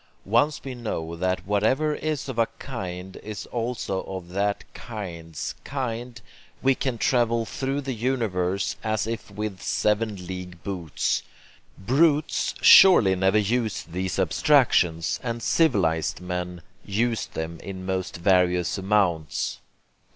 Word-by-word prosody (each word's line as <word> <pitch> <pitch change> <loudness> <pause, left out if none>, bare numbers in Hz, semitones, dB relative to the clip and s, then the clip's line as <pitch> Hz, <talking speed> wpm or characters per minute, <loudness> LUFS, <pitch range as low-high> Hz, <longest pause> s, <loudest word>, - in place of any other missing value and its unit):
Once 120 +9 +2
we 135 - -5
know 85 -9 -4
that 90 0 -1
whatever 110 +10 +2
is 155 -2 -3
of 130 -3 -4
a 115 - +4
kind 95 -8 -6
is 105 -1 -7
also 115 -5 -2
of 95 -2 -7
that 100 +2 -1
kind's 85 - -6
kind, 120 -3 -4 0.4
we 135 0 +5
can 130 -2 -2
travel 115 -1 +2
through 135 +4 -2
the 135 -2 -3
universe 105 -6 -1
as 110 -2 0
if 115 -1 -5
with 105 -2 -5
seven 105 -3 0
league 90 -1 -7
boots. 90 -7 -1 0.6
Brutes 145 - +2
surely 115 - +8
never 95 +3 +3
use 110 +1 0
these 90 +2 -3
abstractions, 90 - +3
and 115 -1 -4
civilized 80 - +2
men 90 -1 -4 0.2
use 110 +1 0
them 80 +1 -5
in 95 -1 -7
most 95 -2 -2
various 90 0 +2
amounts. 95 -6 0
105 Hz, 125 wpm, -25 LUFS, 90-120 Hz, 0.6 s, surely